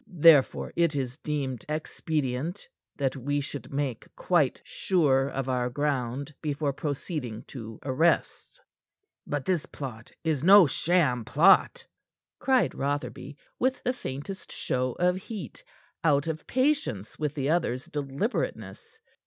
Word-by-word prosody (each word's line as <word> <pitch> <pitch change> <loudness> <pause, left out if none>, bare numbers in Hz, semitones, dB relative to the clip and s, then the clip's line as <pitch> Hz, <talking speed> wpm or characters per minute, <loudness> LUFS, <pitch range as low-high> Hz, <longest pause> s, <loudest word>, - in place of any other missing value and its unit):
Therefore, 160 -5 +5
it 170 -3 +2
is 135 0 -3
deemed 140 -6 -3
expedient 155 +1 -2 0.3
that 135 -1 0
we 145 +2 -1
should 145 0 -6
make 135 -4 -2
quite 155 -8 +2
sure 140 -8 +2
of 135 -1 -3
our 125 -1 0
ground 140 0 -2
before 145 -2 -1
proceeding 140 - -4
to 115 -4 -8
arrests." 160 - 0 0.7
"But 145 -2 -2
this 180 -5 0
plot 120 -6 -8
is 155 -4 0
no 195 +1 +9
sham 145 -6 +2
plot," 195 - +4 0.5
cried 260 -2 +2
Rotherby, 145 0 -3 0.2
with 260 +1 0
the 250 - +1
faintest 185 - -7
show 125 0 -1
of 180 +1 +1
heat, 190 - -8 0.4
out 145 -3 +3
of 160 -1 -4
patience 260 - 0
with 150 -1 -2
the 140 0 0
other's 145 -6 0
deliberateness. 150 - -3
145 Hz, 125 wpm, -27 LUFS, 130-170 Hz, 0.7 s, no